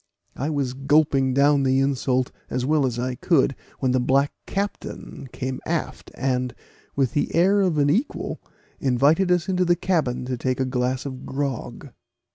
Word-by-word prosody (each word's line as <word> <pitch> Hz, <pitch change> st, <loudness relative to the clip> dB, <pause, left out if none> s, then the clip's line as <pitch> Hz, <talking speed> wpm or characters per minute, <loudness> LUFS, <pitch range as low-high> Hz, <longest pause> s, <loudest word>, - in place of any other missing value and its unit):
I 140 Hz, -, -2 dB
was 140 Hz, -4 st, -1 dB
gulping 140 Hz, -1 st, +2 dB
down 140 Hz, +1 st, +4 dB
the 135 Hz, 0 st, +2 dB
insult 130 Hz, -2 st, +1 dB, 0.2 s
as 125 Hz, -, -1 dB
well 150 Hz, -1 st, +2 dB
as 120 Hz, -2 st, -3 dB
I 125 Hz, +1 st, -1 dB
could, 135 Hz, 0 st, +2 dB, 0.2 s
when 130 Hz, -2 st, 0 dB
the 130 Hz, -, +2 dB
black 135 Hz, +3 st, +2 dB
captain 195 Hz, -8 st, -5 dB
came 130 Hz, 0 st, -4 dB
aft, 165 Hz, -1 st, -3 dB
and, 125 Hz, -2 st, -1 dB, 0.4 s
with 135 Hz, -3 st, +1 dB
the 145 Hz, -, -1 dB
air 195 Hz, +4 st, +4 dB
of 180 Hz, -5 st, +1 dB
an 145 Hz, 0 st, +3 dB
equal, 235 Hz, -, -2 dB, 0.4 s
invited 145 Hz, +8 st, +3 dB
us 175 Hz, -2 st, +2 dB
into 185 Hz, -1 st, +1 dB
the 175 Hz, -1 st, +3 dB
cabin 155 Hz, -10 st, 0 dB
to 125 Hz, -1 st, -3 dB
take 130 Hz, +1 st, -1 dB
a 130 Hz, -, +1 dB
glass 130 Hz, +1 st, -1 dB
of 130 Hz, -2 st, -6 dB
grog. 135 Hz, -1 st, -4 dB
135 Hz, 170 wpm, -24 LUFS, 130-155 Hz, 0.4 s, down